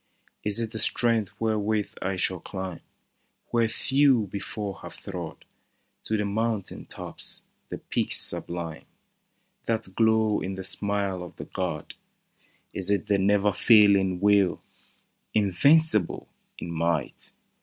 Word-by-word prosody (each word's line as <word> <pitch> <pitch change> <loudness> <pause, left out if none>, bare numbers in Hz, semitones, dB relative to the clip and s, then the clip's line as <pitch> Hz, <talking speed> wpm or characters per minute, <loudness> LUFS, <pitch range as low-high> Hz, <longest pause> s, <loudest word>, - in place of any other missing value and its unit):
" - - -35
Is 105 +1 -1
it 115 -2 -2
the 110 - -4
strength 115 -3 +1
wherewith 110 -1 0
I 95 +1 -1
shall 90 0 -1
climb 95 -1 -6 0.7
Where 115 -1 +2
few 135 -3 +3
before 100 -1 -5
have - - -10
trod 90 -5 -7 0.3
— - - -46
To 110 - 0
the 105 - -1
mountain 110 0 -2
tops, - - -1 0.3
the - - -5
peaks - - -1
sublime 85 -2 -1 0.8
That 110 -4 -2
glow 110 0 +3
in 95 +1 -3
the 95 - -6
smile 100 -1 -1
of 90 - -9
the - - -8
god? - - -4 0.4
" - - -38
Is 95 0 -2
it 100 +1 +1
the 100 -2 +2
never 100 +1 +3
failing 100 -5 +5
will, 100 -2 +3 0.7
Invincible 110 - +3 0.3
in 85 - -6
might. 85 0 -2
100 Hz, 135 wpm, -26 LUFS, 95-110 Hz, 0.8 s, failing